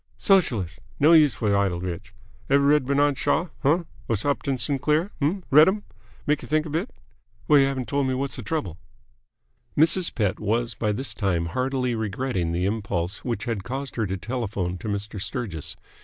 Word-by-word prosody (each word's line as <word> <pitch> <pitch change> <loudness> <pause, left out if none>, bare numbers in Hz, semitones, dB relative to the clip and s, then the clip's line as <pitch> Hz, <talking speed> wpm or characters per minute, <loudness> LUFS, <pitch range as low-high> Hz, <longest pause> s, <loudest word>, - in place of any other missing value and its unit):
"Sogelist! 115 - +2 0.2
No 155 +4 +6
use 150 -7 +6
f'r 105 -3 +1
idle 95 -3 +1
rich. 90 -1 -6 0.4
Ev' 140 +1 +5
read 140 0 +3
B'nard 140 0 +2
Shaw? 165 +4 0
Huh? 160 +5 +2 0.3
Or 115 - +2
Upton 140 -1 0
Sinclair? 150 +7 +1
Uh? 170 +8 +1
Read'm. 190 +9 +6 0.4
Make 150 0 +1
y'think 155 +1 0
a 155 - -6
bit. 170 - -1 0.6
Well, 150 -2 +6
y'haven't 135 -2 +1
told 140 -1 0
me 130 - 0
whasser 135 -1 -3
trouble." 100 - -3 1.0
Mrs. 165 +4 +4
Pett 105 -5 0
was 115 +2 0
by 105 0 -1
this 115 +1 -3
time 95 -5 0
heartily 130 -1 0
regretting 110 -4 -2
the 90 +2 -1
impulse 100 -3 -2
which 115 -4 -3
had 115 -5 -3
caused 135 +5 -5
her 110 -3 -1
to 95 +1 -3
telephone 100 -5 -3
to - - -7
Mr. 100 0 -4
Sturgis. 95 -9 -5
125 Hz, 170 wpm, -24 LUFS, 100-145 Hz, 1.0 s, No